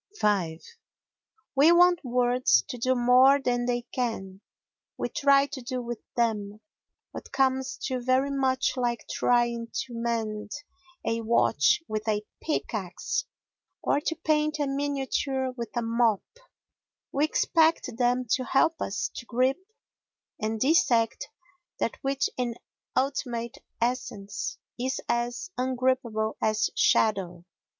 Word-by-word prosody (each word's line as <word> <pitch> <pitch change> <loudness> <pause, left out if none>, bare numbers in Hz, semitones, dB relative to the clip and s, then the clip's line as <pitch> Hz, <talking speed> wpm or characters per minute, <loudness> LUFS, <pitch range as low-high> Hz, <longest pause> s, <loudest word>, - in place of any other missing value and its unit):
v 180 -6 +1 1.0
We 290 +5 +6
want 350 0 +5
words 245 - +3
to 250 - -5
do 255 +2 +2
more 255 +3 +6
than 245 -2 0
they 240 -1 0
can. 195 -6 -3 0.6
We - - -2
try 280 0 +4
to 285 -2 -7
do 255 +1 -4
with 240 -2 -5 0.2
them 215 -3 -1 0.5
what - - -9
comes 265 -1 +1
to 255 -2 -2
very 260 +3 +2
much 265 -1 +1
like 240 -2 -1
trying 235 -1 +1
to 255 -2 -4
mend 225 -3 -2 0.6
a 230 0 0
watch 155 - +3
with 215 0 -4
a 210 -1 0 0.2
pickaxe 235 - -2 0.6
or - - +2
to 325 +1 -2
paint 305 0 +2
a 295 - 0
miniature 275 -1 -1
with 235 -3 -5
a 240 - +1
mop; 230 -2 +2 0.9
we 285 - +1
expect 320 +1 +2
them 250 +1 +2
to 260 - +2
help 320 +5 +2
us 200 - -2
to - - -7
grip 255 +4 +1 0.8
and 220 +1 -1
dissect 240 -5 +2 0.5
that - - -1
which 275 0 0
in 245 -2 -1 0.4
ultimate 255 -4 -1 0.2
essence 230 -4 -3 0.2
is 260 +2 -1
as 240 +8 -2
ungrippable 255 -4 0
as 215 0 +1
shadow. 180 -5 +2
245 Hz, 125 wpm, -27 LUFS, 225-270 Hz, 1.0 s, We